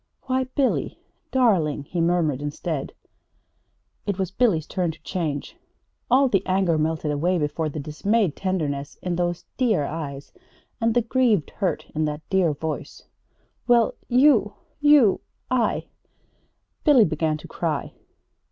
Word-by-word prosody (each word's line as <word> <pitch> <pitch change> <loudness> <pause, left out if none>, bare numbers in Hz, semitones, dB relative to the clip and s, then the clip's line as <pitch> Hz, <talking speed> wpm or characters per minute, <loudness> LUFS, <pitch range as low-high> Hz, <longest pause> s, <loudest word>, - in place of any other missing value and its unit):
"Why, 260 0 0
Billy 260 +1 -1 0.3
darling!" 185 - +2
he 170 +4 -3
murmured 165 -5 +1
instead. 145 0 -4 1.1
It 200 -2 -1
was 190 -2 -2
Billy's 190 -9 +2
turn 180 -1 -1
to 155 -1 -8
change. 155 -6 -3 0.5
All 265 +3 +5
the 195 -6 +1
anger 185 -4 +2
melted 155 -1 -1
away 170 +5 +1
before 155 0 -1
the 150 - -5
dismayed 170 +5 0
tenderness 150 -7 -2
in 180 -1 -1
those 175 0 -2
dear 225 - +2
eyes 140 -2 -6 0.5
and 225 0 +2
the 240 - +3
grieved 230 - +2
hurt 185 -6 -2
in 155 0 0
that 150 +1 -5
dear 190 -4 +3
voice. 155 +2 -5 0.6
"Well, 235 -2 +4
you 245 -5 +4 0.2
you 290 -9 +5 0.3
I 245 -4 +1 0.5
" - - -45
Billy 275 -8 +6
began 155 -1 0
to - - -12
cry. - - -3
175 Hz, 135 wpm, -24 LUFS, 155-230 Hz, 1.1 s, Billy